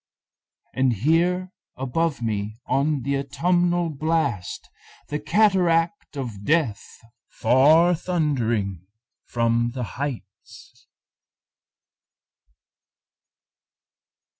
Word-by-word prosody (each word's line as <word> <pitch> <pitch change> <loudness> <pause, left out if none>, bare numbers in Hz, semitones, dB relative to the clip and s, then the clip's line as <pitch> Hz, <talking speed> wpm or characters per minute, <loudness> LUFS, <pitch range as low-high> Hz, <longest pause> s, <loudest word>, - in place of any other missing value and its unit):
And 130 -2 +2
hear 170 - +1 0.3
above 135 +1 -1
me 105 -1 -2
on 140 -1 0
the 140 +1 0
autumnal 175 +5 0
blast 150 - -2 0.4
The 150 - -2
cataract 175 -1 +1
of 115 -7 -6
Death 145 -8 +1 0.5
far 155 +7 +4
thundering 120 - -1 0.4
from 115 0 0
the 125 - -3 0.2
heights. 120 -2 -8
140 Hz, 70 wpm, -23 LUFS, 120-165 Hz, 0.5 s, far